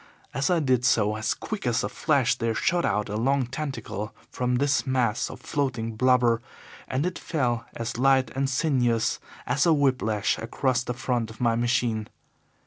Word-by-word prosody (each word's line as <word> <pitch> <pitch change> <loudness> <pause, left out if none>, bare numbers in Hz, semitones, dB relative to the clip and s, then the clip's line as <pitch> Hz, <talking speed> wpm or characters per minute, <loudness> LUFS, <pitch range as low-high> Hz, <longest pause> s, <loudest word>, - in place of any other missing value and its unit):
As 140 +4 0
I 175 -2 +3
did 130 -5 +2
so, 110 -5 +3
as 110 +1 -1
quick 210 - -5
as 120 -1 +1
a - - 0
flash 135 +1 +2
there 115 -1 -1
shot 170 +8 +1
out 105 +1 0
a 105 - -4
long 135 +4 +1
tentacle 120 -6 -5 0.2
from 125 0 0
this 140 +1 +1
mass 125 -4 +1
of - - -9
floating 120 -6 -2
blubber, 120 -1 +3 0.5
and 130 +4 -1
it 180 - -3
fell 120 -7 -1
as 115 0 -4
light 130 -2 +3
and 135 +1 0
sinuous 125 -5 +1 0.3
as 140 +7 +2
a 165 - +6
whip 140 -3 +2
lash 105 -1 0
across 125 +2 0
the 125 - -4
front 120 -2 -1
of 110 - -12
my 115 -2 +2
machine. 115 -2 0
125 Hz, 180 wpm, -26 LUFS, 115-135 Hz, 0.5 s, a